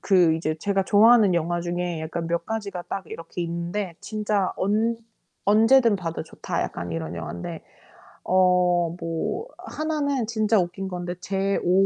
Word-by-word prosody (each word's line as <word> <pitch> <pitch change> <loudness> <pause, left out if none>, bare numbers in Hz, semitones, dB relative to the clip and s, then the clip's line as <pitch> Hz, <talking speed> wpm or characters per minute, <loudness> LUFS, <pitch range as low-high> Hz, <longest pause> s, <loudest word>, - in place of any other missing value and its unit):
그 180 -5 +4
이제 155 -1 -1
제가 195 +2 0
좋아하는 215 -1 +6
영화 170 +1 0
중에 175 -1 -2
약간 165 +1 -4
몇 170 0 -1
가지가 200 -5 -4
딱 195 -4 -4
이렇게 165 +2 -7
있는데, 170 +2 -3
진짜 210 -3 -1
언 220 +4 +1 0.5
언제든 225 +1 +5
봐도 165 -3 -4
좋다 - - -3
약간 85 -1 -5
이런 80 0 -4
영화인데. 85 0 -6 0.6
어 180 -1 +4 0.3
뭐 165 - -3
하나는 285 -6 -2
진짜 220 -2 +2
웃긴 185 +2 -2
건데 175 -1 -4
제 195 +1 0
5 185 +2 +4
185 Hz, 285 characters per minute, -25 LUFS, 170-210 Hz, 0.6 s, 좋아하는